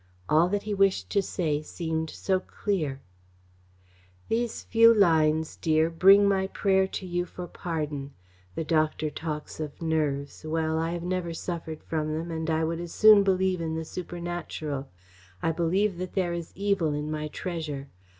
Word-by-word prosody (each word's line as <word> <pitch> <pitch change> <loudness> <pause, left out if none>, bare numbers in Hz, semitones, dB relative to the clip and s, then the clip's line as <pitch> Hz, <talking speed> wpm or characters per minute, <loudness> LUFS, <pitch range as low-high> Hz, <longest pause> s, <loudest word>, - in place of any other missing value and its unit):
All 165 +3 +4
that 205 +1 -1
he 210 - -3
wished 195 - +2
to 200 - +3
say 155 -6 -1
seemed 160 0 -3
so 190 +3 0
clear: 160 -9 -3 1.3
These 230 0 -1
few 230 0 +6
lines, 160 -6 +3
dear, 160 +1 +2
bring 195 +4 +6
my 190 -1 +2
prayer 190 -1 +2
to 190 - -5
you 175 0 -1
for 180 - -7
pardon. 150 -5 -4 0.4
The - - -2
doctor 155 -1 +1
talks 150 -1 -5
of 150 -2 -5
nerves. 150 -4 -1
Well, 160 0 0
I 165 +2 -1
never 175 -1 -3
suffered 160 -2 -5
from 155 -1 -2
them, 165 +2 -4
and 160 0 -3
I 160 0 +1
would 165 +1 -1
as 175 -1 -7
soon 215 -1 +8
believe 190 -2 +1
in 160 -1 -2
the 160 0 -3
supernatural. 170 -5 -5 0.5
I 165 - +2
believe 175 +3 +1
that 185 -1 -5
there 180 -3 0
is 170 -1 -5
evil 195 -5 +1
in 150 +1 -3
my 155 0 -3
treasure. 150 -4 -5
165 Hz, 160 wpm, -27 LUFS, 155-185 Hz, 1.3 s, soon